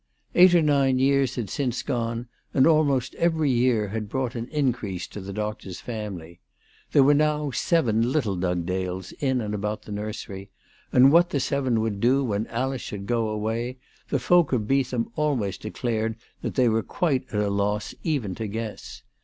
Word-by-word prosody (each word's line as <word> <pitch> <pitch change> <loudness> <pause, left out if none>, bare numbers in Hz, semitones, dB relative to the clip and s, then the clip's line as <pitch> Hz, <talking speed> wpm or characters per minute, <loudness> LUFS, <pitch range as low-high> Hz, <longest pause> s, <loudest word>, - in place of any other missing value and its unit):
Eight 180 0 +7
or 170 - +5
nine 140 -3 +3
years 135 -1 +2
had 120 -5 -3
since 125 +3 -2
gone, 120 -2 -2 0.3
and 130 - +5
almost 145 -6 +3
every 160 -4 +2
year 120 -4 +2
had 105 0 -4
brought 130 0 -2
an 115 -1 -4
increase 120 - -1
to 105 - -8
the 95 +1 -7
doctor's 105 -3 -5
family. 100 -8 -6 0.5
There 140 - +6
were 145 +2 +6
now 150 -1 +1
seven 120 -6 +1
little 115 -10 0
Dugdales 90 +1 -2
in 130 -3 +1
and 105 -1 -3
about 105 +1 -3
the 105 - -10
nursery; 105 -1 -6 0.4
and 130 +2 +7
what 170 +2 +5
the 140 - 0
seven 130 -3 0
would 110 -3 -2
do 130 +5 +3
when 110 -3 -1
Alice 130 +2 -2
should 100 -1 -6
go 115 -1 0
away 115 +4 -2 0.3
the 140 - +1
folk 170 +5 +3
of 110 -4 0
Beetham 130 -3 0
always 140 - 0
declared 110 0 -2 0.3
that - - -4
they 125 -2 +4
were 115 0 +2
quite 140 - -1
at 105 - -1
a 105 -1 +1
loss 105 +1 -1
even 135 - -1
to 110 +3 -4
guess. 110 +1 -6
120 Hz, 180 wpm, -25 LUFS, 105-135 Hz, 0.5 s, Eight